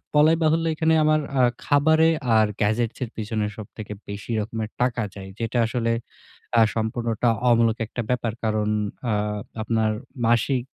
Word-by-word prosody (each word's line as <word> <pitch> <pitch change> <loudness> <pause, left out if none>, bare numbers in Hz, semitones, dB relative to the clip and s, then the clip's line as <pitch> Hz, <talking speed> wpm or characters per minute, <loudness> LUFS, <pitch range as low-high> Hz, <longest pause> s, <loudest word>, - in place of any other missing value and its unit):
বলাই 155 +2 +6
বাহুল্য 160 +1 +2
এখানে 160 +1 +2
আমার 155 0 +4 0.2
আ - - +5 0.2
খাবারে 160 +3 +4 0.3
আর 110 -1 +5
গ্যাজেটস 110 +2 +1
এর 120 - -4
পিছনে 110 -1 -2
সবথেকে 105 0 -8 0.2
বেশি 100 +3 -6
রকমের 110 0 -4
টাকা 125 -2 +1
যায়। 95 -1 -8
যেটা 115 +1 -2
আসলে 115 0 -1 0.7
আ - - +7
সম্পূর্ণটা 115 +1 0 0.2
অমূলক 115 -1 +3
একটা 120 - -4
ব্যাপার। 120 -3 0
কারণ 110 -1 0 0.4
আ - - +2 0.5
আপনার 110 0 +1 0.4
মাসিক 120 +3 +2
115 Hz, 145 wpm, -24 LUFS, 110-125 Hz, 0.7 s, আ